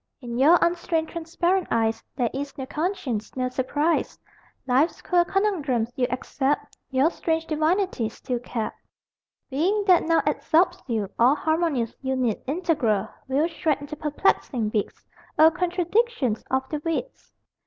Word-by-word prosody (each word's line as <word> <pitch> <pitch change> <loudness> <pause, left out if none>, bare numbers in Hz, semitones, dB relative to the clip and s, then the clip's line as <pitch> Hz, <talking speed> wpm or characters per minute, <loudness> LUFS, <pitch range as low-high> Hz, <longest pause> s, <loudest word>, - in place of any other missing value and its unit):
In 240 -3 -5
your 315 +6 +7
unstained 340 -2 0
transparent 345 +2 0
eyes 225 -1 0
There 240 -4 0
is 275 +1 -5
no 265 - -4
conscience, 300 - -3
no 255 -1 -1
surprise: 290 +6 0 0.5
Life's 265 +6 +2
queer 355 -1 +2
conundrums 305 - 0
you 250 -1 +1
accept, 265 +3 -2
Your 270 +5 +3
strange 325 -1 -1
divinity 315 - 0
still 245 +2 -4
kept. 235 -2 -4 0.8
Being, 375 +10 +1
that 365 -3 +6
now 330 0 +2
absorbs 350 +3 +2
you, 220 -5 -1
all 250 +5 +6
Harmonious, 315 -7 0
unit, 260 -5 -1
integral, 285 - 0 0.2
Will 280 +5 +2
shred 320 -4 -1
into 290 +1 -7
perplexing 290 - 0
bits, 210 -1 -3 0.3
Oh, 320 +1 +7
contradictions 360 - 0
of 265 0 0
the 300 -1 -3
wits! 330 +10 -4
300 Hz, 135 wpm, -25 LUFS, 255-340 Hz, 0.8 s, your